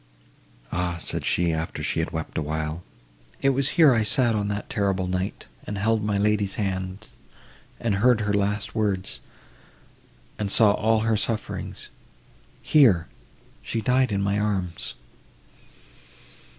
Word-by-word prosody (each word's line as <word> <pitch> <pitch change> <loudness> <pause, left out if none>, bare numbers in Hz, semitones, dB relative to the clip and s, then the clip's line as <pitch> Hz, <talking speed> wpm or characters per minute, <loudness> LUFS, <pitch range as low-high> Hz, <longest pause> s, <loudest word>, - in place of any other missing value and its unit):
"Ah!" 85 0 -1
said - - 0
she, 85 -2 +1
after 80 +1 -4
she - - 0
had - - -1
wept 80 0 -5
awhile, 80 +2 -3 0.6
"it 135 - +5
was 135 0 +1
here 155 -6 +7
I 115 - +2
sat 115 +3 +2
on 105 -1 -1
that 100 0 -3
terrible 100 -6 0
night, 90 +1 -3 0.2
and 105 - -4
held 110 +2 +1
my 105 -1 0
lady's 105 -1 +1
hand, 95 +1 -3 0.7
and 115 -3 0
heard 120 -1 +4
her 105 -1 0
last 100 +1 -1
words, 100 -4 -1 1.2
and 105 -2 -1
saw 105 +1 +6
all 110 +1 +2
her 110 0 +1
sufferings—here 100 - -1 0.5
she 115 - -3
died 125 +2 +2
in 100 -1 0
my 100 +1 0
arms!" 95 -10 -2
100 Hz, 135 wpm, -25 LUFS, 95-110 Hz, 1.2 s, here